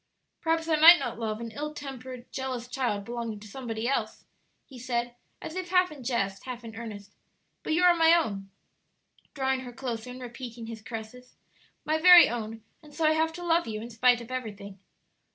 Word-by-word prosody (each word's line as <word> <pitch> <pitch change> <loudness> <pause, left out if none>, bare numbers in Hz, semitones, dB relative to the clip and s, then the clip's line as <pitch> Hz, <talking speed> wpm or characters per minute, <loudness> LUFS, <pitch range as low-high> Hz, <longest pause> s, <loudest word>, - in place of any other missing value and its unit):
"Perhaps 325 0 0
I 315 -2 +2
might 335 +3 +10
not 245 -6 -4
love 215 -1 -3
an 230 -1 -6
ill 300 +4 -5
tempered, 255 -3 -8
jealous 255 -3 -4
child 245 -6 -2
belonging 235 -2 -5
to 215 - -11
somebody 230 -1 -4
else," 275 - -2 0.4
he 260 -3 -13
said, 240 0 -2 0.2
as 315 - -8
if 370 -1 -4
half 365 -1 +3
in 285 -4 -10
jest, 200 -6 -2
half 250 -2 -6
in 225 -1 -9
earnest; 215 -3 -8 0.5
"but - - -2
you 350 +3 +2
are 355 -1 +7
my 325 -1 +5
own," 200 -12 -1 0.9
drawing 265 -1 0
her 255 -1 -8
closer 240 -1 -5
and 250 +1 -8
repeating 240 -1 -8
his 225 -1 -8
caresses, 225 +3 -9 0.5
"my 310 +1 +1
very 355 +1 +9
own; 225 -1 -5 0.2
and 300 -2 -16
so 320 0 0
I 310 - +5
have 320 +1 +1
to 350 +1 -7
love 340 -2 +2
you 215 -1 -4
in 235 +2 -8
spite 245 +1 +3
of 235 +2 -11
everything. 205 -6 -6
250 Hz, 195 wpm, -28 LUFS, 225-300 Hz, 0.9 s, might